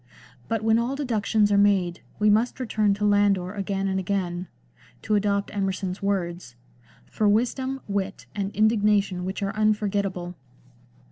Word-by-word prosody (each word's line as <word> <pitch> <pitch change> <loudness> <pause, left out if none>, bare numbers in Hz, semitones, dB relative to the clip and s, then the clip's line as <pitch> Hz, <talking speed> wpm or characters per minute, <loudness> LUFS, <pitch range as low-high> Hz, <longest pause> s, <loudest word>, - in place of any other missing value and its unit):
But 225 -2 -1
when 225 +1 +3
all 245 +4 -1
deductions 220 -6 +1
are 200 - +4
made 190 -4 +2 0.2
we 210 - +2
must 220 +5 +2
return 215 -5 +1
to 210 +1 -2
Landor 200 -3 +2
again 195 -1 -2
and 190 0 0
again 180 -2 -2 0.3
— - - -28
to 215 - -1
adopt 200 -1 +1
Emerson's 190 -1 -2
vi^ords 175 -9 -2
— 120 0 -32
" - - -28
for 210 -1 +2
wisdom, 260 +5 0
wit, 195 -1 -3
and 200 -1 -2
indignation 205 -4 +2
which 190 +2 -4
are 195 0 -2
unforgetable." 200 -4 0
200 Hz, 155 wpm, -25 LUFS, 190-215 Hz, 0.3 s, are